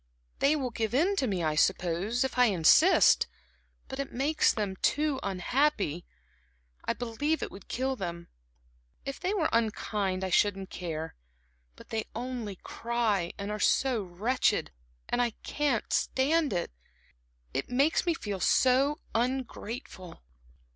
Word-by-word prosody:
"They 285 +2 +4
will 260 -5 -2
give 225 0 -2
in 360 +9 +3
to 265 - +1
me, 190 -5 -1
I 155 -1 +1
suppose, 185 - +1
if 265 - -3
I 250 - +7
insist; 205 - +5 0.6
but 265 - -7
it 275 - -3
makes 290 +5 +2
them 200 -3 -3
too 295 +3 +1
unhappy. 195 - 0 0.8
I - - +1
believe 245 +7 -2
it - - -5
would 195 - -12
kill 265 +2 -1
them. 170 -5 -5 0.8
If 275 - -5
they 365 +3 -1
were 365 -7 +1
unkind, 210 -4 0
I 190 - -2
shouldn't 195 -1 +2
care; 160 -2 -5 0.6
but - - -15
they 220 -1 -2
only 235 -4 -4
cry, 225 -7 -1
and 200 +1 -4
are 210 - -3
so 255 +1 +2
wretched, 200 - 0 0.4
and 245 - +1
I 240 -2 0
can't 285 -6 -1
stand 295 +3 +2
it. 175 -2 -2 0.8
It 135 - -2
makes 275 +6 +2
me 335 - +2
feel 205 -9 -4
so 270 - +3
ungrateful." 235 - -4
230 Hz, 140 wpm, -29 LUFS, 190-270 Hz, 0.8 s, I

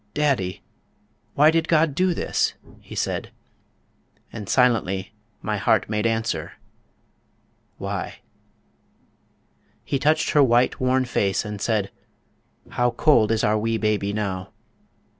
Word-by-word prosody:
daddy, 130 - 0 0.7
why 150 +2 +6
did 165 0 0
God 160 -2 +3
do 180 +3 +1
this?" - - 0 0.2
he - - -12
said, - - -2 1.0
And 105 -4 -7
silently 110 -7 +1 0.3
my 105 -1 -1
heart 110 +1 +1
made 105 +1 +1
answer, 115 0 -2 1.2
"Why?" - - -4 1.7
He 140 - -2
touched 155 +3 +2
her 150 - +5
white, 125 -1 +3
worn 130 0 +2
face, 100 -4 0
and 105 -1 -6
said, 105 -4 0 0.8
"How 125 0 +1
cold 120 -2 +3
Is 110 -1 +1
our 105 0 +2
wee 115 +1 0
baby 105 -2 0
now."... 95 -3 -3
115 Hz, 120 wpm, -23 LUFS, 105-135 Hz, 1.7 s, why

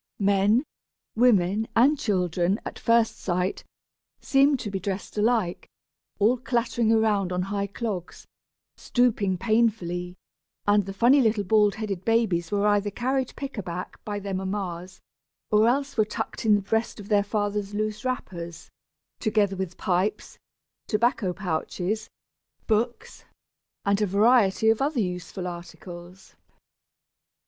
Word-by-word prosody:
Men, 200 +4 +3 0.5
women, 220 -3 +3
and 260 +6 +5
children, 185 - 0
at - - -6
first 230 -1 +2
sight, 180 +1 -1 0.6
seemed 275 0 +3
to 210 - -5
be 195 - -2
dressed 190 +1 -5
alike, 215 -4 0 0.5
all 230 +5 +3
clattering 235 -1 0
around 210 -4 +2
on 180 0 0
high 200 +1 -2
clogs, 200 -4 -5 0.5
stooping 215 -6 +1
painfully; 185 -5 0 0.5
and 205 -1 +3
the - - -4
funny 245 +7 +5
little 220 -3 +2
bald 210 +1 +3
headed 200 -4 -4
babies 205 -7 +1
were 205 0 +1
either 205 0 +2
carried 255 +4 -2
pick 275 -5 -6
a - - -1
back 175 0 -7
by 205 -1 -4
their 200 -1 -5
mammas, 185 -2 -4 0.5
or 215 +1 +5
else 275 +3 0
were 215 - +5
tucked 220 +1 -4
in 210 - +6
the 205 - 0
breast 225 +3 -1
of 200 - -9
their 205 -1 +3
fathers' 205 -1 -2
loose 215 0 -2
wrappers, 170 -10 -5 0.5
together 210 -3 +1
with 185 -1 -5
pipes, 185 +3 -1 0.5
tobacco 215 -3 +1
pouches, 185 +4 -3 0.6
books, 240 - -1 0.6
and 200 +1 +2
a 210 - +2
variety 220 +1 +4
of 225 - -1
other 285 -1 0
useful 180 -2 -3
articles. 175 +1 -9
205 Hz, 135 wpm, -26 LUFS, 190-225 Hz, 0.6 s, in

